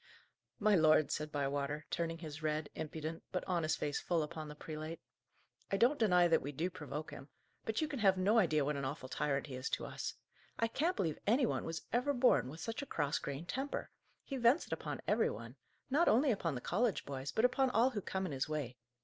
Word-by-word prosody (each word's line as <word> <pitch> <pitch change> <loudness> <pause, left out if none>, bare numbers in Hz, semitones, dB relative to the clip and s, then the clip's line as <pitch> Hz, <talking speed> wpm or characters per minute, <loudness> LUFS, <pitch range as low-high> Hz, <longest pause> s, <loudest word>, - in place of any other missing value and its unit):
"My 215 0 +3
lord," 155 -4 +5
said 150 0 -2
Bywater, 145 +1 -1
turning 165 0 -1
his 155 -2 -7
red, 155 0 -1
impudent, 160 +1 -5
but 185 - -1
honest 170 -4 0
face 145 -1 -1
full 170 -3 +1
upon 155 0 -6
the 150 - -8
prelate, 155 +2 -6 0.7
"I 195 - +2
don't 250 +8 +4
deny 180 -6 +5
that 165 - +4
we 140 - -4
do 165 +6 -2
provoke 155 -3 -6
him; 135 - -10 0.4
but 220 +5 0
you 310 - +1
can 285 -4 -4
have 195 -3 +4
no 205 +5 +4
idea 155 -7 +3
what 150 +1 0
an 140 - -3
awful 130 -1 -4
tyrant 140 -1 0
he 140 - -8
is 130 +1 -3
to - - -2
us. - - -4 0.4
I 230 - +2
can't 335 +10 +1
believe 160 -5 -1
any 245 +5 +4
one - - -1
was 165 0 -4
ever 250 +4 +2
born 250 - +4
with 160 +4 -8
such 225 +4 -3
a 280 - -6
cross 145 0 0
grained 140 +4 -5
temper. 270 +2 -3 0.3
He 275 - -4
vents 245 +6 +4
it - - -5
upon - - -4
every - - +3
one: - - -7 0.4
not 315 +6 +4
only 260 +5 +5
upon 170 - -1
the 125 - -4
college 220 - 0
boys, 135 0 -4
but 220 - +3
upon 260 +1 +3
all 250 +2 +4
who 210 -5 -3
come 190 +1 -2
in 180 - -3
his 135 +1 -2
way. 140 -5 -3
165 Hz, 225 wpm, -35 LUFS, 150-225 Hz, 0.7 s, lord